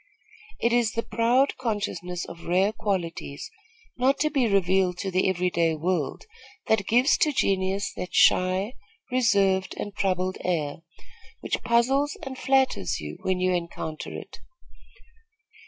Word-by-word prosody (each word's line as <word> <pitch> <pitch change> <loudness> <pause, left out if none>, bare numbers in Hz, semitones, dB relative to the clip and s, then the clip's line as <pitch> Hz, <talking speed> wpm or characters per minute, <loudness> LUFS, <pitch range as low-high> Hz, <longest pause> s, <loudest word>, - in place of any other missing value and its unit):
It 235 0 +1
is 235 -2 +2
the 230 - -1
proud 245 +4 +2
consciousness 200 -7 -3
of 170 - -11
rare 185 +4 +3
qualities, 170 -9 -4 0.5
not 260 +2 +3
to 305 0 +2
be 265 -5 +2
revealed 190 -2 +2
to 190 +1 -3
the 185 +1 +2
every 180 -1 0
day 165 -2 +1
world, 160 -3 -2 0.4
that 205 -3 +1
gives 250 +6 +4
to 305 - +3
genius 195 -5 0
that 180 - -6
shy, 185 +5 +3 0.4
reserved 200 -6 +2
and 205 - -5
troubled 185 -1 -1
air, 155 -5 -1 0.6
which - - -2
puzzles 265 +5 +2
and 270 -1 -6
flatters 260 - +1
you, 75 0 -7
when 185 -1 0
you 185 0 +2
encounter 170 -2 -4
it. - - -9
190 Hz, 140 wpm, -26 LUFS, 180-235 Hz, 0.6 s, gives